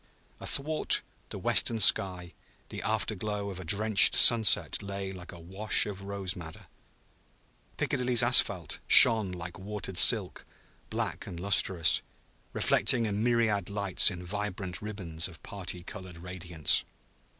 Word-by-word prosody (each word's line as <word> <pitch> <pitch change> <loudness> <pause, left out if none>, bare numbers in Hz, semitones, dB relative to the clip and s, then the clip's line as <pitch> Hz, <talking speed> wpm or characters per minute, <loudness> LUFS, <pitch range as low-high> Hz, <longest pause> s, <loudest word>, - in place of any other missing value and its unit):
Athwart 155 +3 +1 0.3
the - - -9
western 115 - 0
sky 90 -4 +3 0.4
the - - -9
after - - -3
glow 105 0 -6
of 95 - -11
a - - -9
drenched 100 +4 +3
sunset 115 -3 +3
lay 100 -1 -8
like 90 -1 -12
a 85 - -14
wash 95 +6 +1
of 100 -2 -9
rose 100 -2 -7
madder. 80 -3 -12 1.1
Piccadilly's 125 -2 0
asphalt - - +3
shone 110 -5 +7
like 85 0 -10
watered 100 -1 -8
silk, - - +3 0.5
black - - -6
and 85 - -10
lustrous, 95 -3 +1 0.5
reflecting 125 -4 -1
a 105 - -5
myriad 110 -2 -2
lights 100 -2 +1
in 90 -2 -10
vibrant 95 -1 -7
ribbons 90 -6 -4
of 85 -4 -17
party 90 -3 -7
colored 95 -3 -12
radiance. 90 -3 -3
95 Hz, 130 wpm, -26 LUFS, 90-105 Hz, 1.1 s, shone